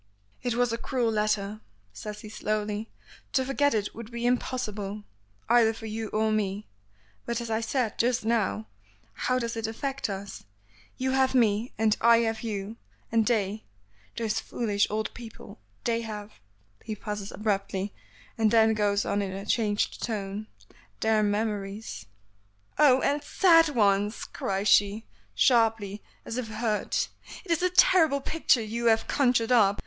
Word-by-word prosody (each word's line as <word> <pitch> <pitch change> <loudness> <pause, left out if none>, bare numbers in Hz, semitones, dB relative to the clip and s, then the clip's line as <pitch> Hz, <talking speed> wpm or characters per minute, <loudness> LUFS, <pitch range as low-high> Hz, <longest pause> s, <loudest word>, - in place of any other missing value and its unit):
"It 245 -2 -1
was 245 -1 +1
a 230 - -3
cruel 245 -4 0
letter," 210 -1 -1 0.3
says 210 - -7
he 215 - -9
slowly; 210 0 -2 0.4
"to 260 - +2
forget 280 -1 +2
it 205 -1 -1
would 230 -1 -9
be 235 0 -4
impossible, 215 -5 -2 0.4
either 230 -1 +4
for 225 - -9
you 220 0 -4
or 215 +1 0
me. 205 -1 -1 0.6
But, 235 0 -1
as 235 -1 -5
I 220 +1 0
said 230 -1 -1
just 240 -1 +1
now, 215 - 0 0.5
how 255 - 0
does 235 -2 -2
it 225 -1 -2
affect 270 +3 -3
us? 195 0 -6 0.5
You 260 0 0
have 265 0 +2
me, 225 -1 +2
and 215 -1 +3
I 235 0 +6
have 225 -1 -1
you; 215 -1 -4 0.3
and 225 -1 +2
they, 215 -3 0 0.5
those 225 -1 0
foolish 205 -3 0
old 215 +1 -2
people, 230 - -11 0.2
they 230 0 0
have 215 -2 -7 0.3
" 100 0 -32
He 215 - -4
pauses 210 -1 -5
abruptly, 200 -1 -2 0.5
and 220 -1 +4
then 220 0 +5
goes 205 -1 +1
on 205 - 0
in 195 -1 -3
a 195 +1 -6
changed 210 -1 0
tone, 210 -1 -4 0.5
"their 220 -1 +3
memories." 205 - -2 0.7
"Oh! 265 -3 +6
and 290 +1 +1
sad 330 0 +5
ones!" 205 -4 +1
cries 195 +1 -3
she, 205 +2 +4 0.3
sharply, 225 -5 +2 0.2
as 230 - -5
if 245 - -4
hurt. 215 -1 -1 0.4
"It 350 - -5
is 335 - +2
a 365 - +3
terrible 330 -5 +5
picture 275 -5 +2
you 230 +2 -2
have 225 -1 +3
conjured 250 -4 +2
up. 205 -5 +4
220 Hz, 155 wpm, -27 LUFS, 205-235 Hz, 0.7 s, I